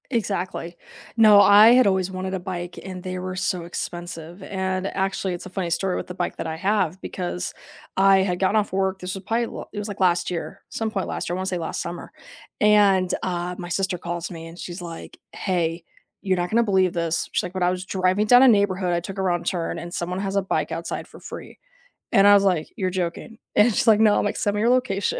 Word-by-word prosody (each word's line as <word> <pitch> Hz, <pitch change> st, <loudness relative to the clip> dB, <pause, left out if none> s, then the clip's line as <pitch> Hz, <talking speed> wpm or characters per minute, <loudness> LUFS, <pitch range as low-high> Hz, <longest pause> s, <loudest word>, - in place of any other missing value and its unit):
Exactly. 185 Hz, -6 st, -2 dB, 0.4 s
No, 215 Hz, -3 st, +7 dB
I 205 Hz, +2 st, +8 dB
had 250 Hz, -1 st, +6 dB
always 190 Hz, -1 st, +1 dB
wanted 185 Hz, 0 st, -4 dB
a 190 Hz, -, -1 dB
bike 175 Hz, -1 st, -6 dB
and 185 Hz, -1 st, -7 dB
they 185 Hz, 0 st, -5 dB
were 185 Hz, 0 st, -5 dB
so 180 Hz, -1 st, -1 dB
expensive. 175 Hz, +1 st, -6 dB
And, 190 Hz, 0 st, -2 dB
actually, 195 Hz, -1 st, -2 dB
it's 175 Hz, -, -7 dB
a -, -, -8 dB
funny 185 Hz, -2 st, -3 dB
story 185 Hz, +2 st, 0 dB
with -, -, -4 dB
the 180 Hz, -, -6 dB
bike 180 Hz, -1 st, -3 dB
that -, -, -4 dB
I 160 Hz, 0 st, -4 dB
have, 190 Hz, -1 st, 0 dB
because 180 Hz, -1 st, -4 dB, 0.4 s
I 195 Hz, 0 st, +5 dB
had 190 Hz, -2 st, +1 dB
gotten 195 Hz, +3 st, +2 dB
off 210 Hz, -3 st, 0 dB
work, 190 Hz, 0 st, 0 dB
this 185 Hz, +1 st, -5 dB
was 195 Hz, -, -8 dB
probably 230 Hz, +4 st, 0 dB
l -, -, -8 dB
it 210 Hz, -, -5 dB
was 205 Hz, -, -4 dB
like 205 Hz, -2 st, -7 dB
last 175 Hz, -1 st, +2 dB
year, 175 Hz, -2 st, -5 dB
some 220 Hz, -1 st, -3 dB
point 195 Hz, -3 st, -2 dB
last -, -, -4 dB
year, 175 Hz, -, -1 dB
I -, -, -3 dB
wanna 185 Hz, -, -3 dB
say 185 Hz, -1 st, -1 dB
last 165 Hz, -2 st, -4 dB
summer. 170 Hz, 0 st, -7 dB, 0.5 s
And, 200 Hz, -3 st, +4 dB
uh, 180 Hz, 0 st, -2 dB
my 175 Hz, -1 st, -7 dB
sister 190 Hz, 0 st, -1 dB
calls 170 Hz, 0 st, -5 dB
me 165 Hz, -2 st, -8 dB
and 165 Hz, +2 st, -12 dB
she's 175 Hz, +1 st, -7 dB
like, 170 Hz, -1 st, -9 dB
"Hey, 170 Hz, -3 st, -2 dB, 0.4 s
you're 190 Hz, -2 st, 0 dB
not 175 Hz, 0 st, -1 dB
gonna 235 Hz, +4 st, +3 dB
believe 190 Hz, -4 st, +2 dB
this." 170 Hz, -2 st, -1 dB
She's -, -, 0 dB
like, 180 Hz, -, -6 dB
"When 185 Hz, -1 st, -1 dB
I 175 Hz, -, +4 dB
was 185 Hz, 0 st, -4 dB
driving 185 Hz, +2 st, +1 dB
down 245 Hz, +3 st, +7 dB
a -, -, +8 dB
neighborhood, 195 Hz, -4 st, +2 dB
I 170 Hz, -, +1 dB
took 190 Hz, +3 st, -8 dB
a -, -, -1 dB
wrong 175 Hz, -2 st, 0 dB
turn 170 Hz, -3 st, -2 dB
and 175 Hz, +1 st, -8 dB
someone 180 Hz, +1 st, -3 dB
has 195 Hz, 0 st, -3 dB
a 200 Hz, -, +3 dB
bike 190 Hz, -, -2 dB
outside -, -, -5 dB
for -, -, -15 dB
free." -, -, -9 dB, 0.6 s
And 195 Hz, +1 st, +6 dB
I 205 Hz, -, +8 dB
was 200 Hz, -1 st, +5 dB
like, 180 Hz, -5 st, +1 dB
"You're 185 Hz, -2 st, 0 dB
joking." 185 Hz, +5 st, -4 dB, 0.2 s
And 215 Hz, +2 st, +5 dB
she's 230 Hz, -, 0 dB
like, 215 Hz, -2 st, +6 dB
"No," 215 Hz, -2 st, +5 dB
I'm -, -, +1 dB
like, 205 Hz, -, -1 dB
"Send 205 Hz, 0 st, 0 dB
me 205 Hz, -, 0 dB
your 230 Hz, -, +3 dB
location," 245 Hz, -6 st, +1 dB
185 Hz, 245 wpm, -23 LUFS, 175-200 Hz, 0.6 s, I